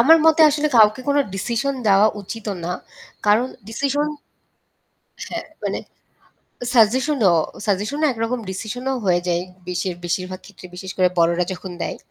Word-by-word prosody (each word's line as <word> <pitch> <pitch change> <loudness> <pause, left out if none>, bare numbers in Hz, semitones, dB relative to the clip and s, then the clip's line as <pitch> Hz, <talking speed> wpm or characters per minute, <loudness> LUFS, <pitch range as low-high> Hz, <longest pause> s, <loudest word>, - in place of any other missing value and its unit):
আমার 315 +7 +8
মতে 320 0 +5
আসলে 300 +1 +1
কাউকে 215 +1 +6
কোনো 285 0 +4
ডিসিশন 240 +7 -1
দেওয়া 200 +1 +6
উচিত 220 +3 -8 0.2
না 175 - -2 0.6
কারণ 215 +4 +4 0.2
ডিসিশন 280 +5 0 1.2
হ্যাঁ, - - -4 0.2
মানে - - -1 1.0
সাজেশনও 240 - +4 0.3
সাজেশনও 215 +10 0
একরকম 230 +1 -2
ডিসিশনও 245 +7 -3
হয়ে 175 -2 +3
যায় 175 0 +1 0.2
বেশির 180 0 -2
বেশিরভাগ 185 +2 -3
ক্ষেত্রে 200 -2 -12
বিশেষ 185 +1 -7
করে 185 -1 +4
বড়রা 170 +1 +3
যখন 185 0 -7
দেয়। - - -3
215 Hz, 135 wpm, -21 LUFS, 185-260 Hz, 1.2 s, আমার